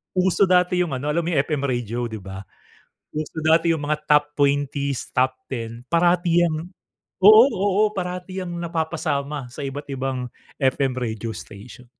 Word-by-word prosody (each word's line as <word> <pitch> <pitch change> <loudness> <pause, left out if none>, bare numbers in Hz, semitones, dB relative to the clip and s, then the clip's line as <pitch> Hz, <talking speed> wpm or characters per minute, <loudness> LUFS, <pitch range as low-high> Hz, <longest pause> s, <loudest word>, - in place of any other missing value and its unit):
uso 185 +1 +3
dati 180 0 +3
'yung 170 -5 -1
ano, 145 +3 -2
alam 170 +3 +1
mo - - -1
'yung 140 - +4
FM 150 -3 -2
radio, 120 -1 -2
'di 110 -1 -7
ba? 95 0 -7 0.7
Uso 155 +1 -4
dati 165 +1 +4
'yung 155 - -4
mga 150 +1 0
top 150 0 +5
20s, 140 -1 0
top 130 +1 +2 0.2
10. 115 -2 -5
Parati 175 0 +3
'yang 155 - -1 0.7
oo, 215 +4 +9
oo, 200 0 +1
parati 180 0 -4
'yang 180 - -6
napapasama 155 -4 -2
sa 140 - -7
iba't-ibang 135 -2 -4 0.3
FM 135 -1 +1
radio 115 -2 -3
station. 120 +4 -11
150 Hz, 155 wpm, -23 LUFS, 130-175 Hz, 0.7 s, oo